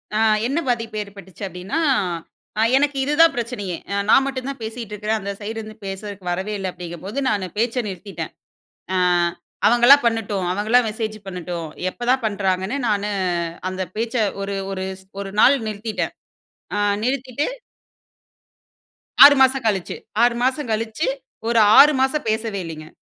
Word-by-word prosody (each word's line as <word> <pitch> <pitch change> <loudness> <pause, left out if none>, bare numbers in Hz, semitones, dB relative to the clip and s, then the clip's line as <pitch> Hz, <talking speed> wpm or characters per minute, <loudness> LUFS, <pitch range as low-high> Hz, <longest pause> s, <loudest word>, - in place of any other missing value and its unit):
அ - - +2 0.3
என்ன 280 +6 0
பாதிப்பு 230 -3 -1
ஏற்பட்டுச்சு 200 -1 -12
அப்படின்னா 185 - -4 0.8
அ - - +3 0.2
எனக்கு 285 0 +1
இதுதான் 310 +3 +5
பிரச்சனையே, 230 -6 -3 0.2
அ - - 0
நான் 270 - +6
மட்டும் 265 -1 -4
தான் 275 - -6
பேசிகிட்டு 220 -1 -6
இருக்கிறேன் 215 +1 -1
அந்த 200 +1 -4
சைடுருந்து 215 +1 -6
பேசறதுக்கு 195 0 -7
வரவே 190 +4 -2
இல்ல 190 -1 -3
அப்படிங்கும்போது 180 - -6
நானு 200 -3 -1
பேச்ச 235 +2 0
நிறுத்திட்டேன். 195 +1 -6 0.6
அ - - +1 0.7
அவங்களா 240 +4 +8
பண்ணட்டும், 215 -5 0
அவங்களா 215 +5 +3
மெசேஜ் 215 0 -4
பண்ணட்டும், 175 -3 -5 0.2
எப்பதான் 245 +5 0
பண்ணுறாங்கன்னு 195 +2 -1
நானு 205 -1 0 0.6
அந்த 185 0 -5
பேச்ச 230 +2 -3 0.3
ஒரு 200 0 -3 0.2
ஒரு 190 -1 -3 0.2
ஸ் - - -20 0.2
ஒரு 195 -1 -6
நாள் 280 - +7
நிறுத்திட்டேன். 215 0 -3 0.6
அ - - 0 0.3
நிறுத்திட்டு. 260 +2 -1 1.8
6 285 0 +9
மாசம் 265 -1 +4
கழிச்சு 195 -4 -1 0.3
6 240 0 +4
மாசம் 265 +2 0
கழிச்சு. 220 +7 -1 0.4
ஒரு 235 0 +3 0.2
6 300 +1 +8
மாசம் 280 +3 +1
பேசவே 220 -2 -1
இல்லைங்க. 155 -1 -8
215 Hz, 140 wpm, -21 LUFS, 195-245 Hz, 1.8 s, 6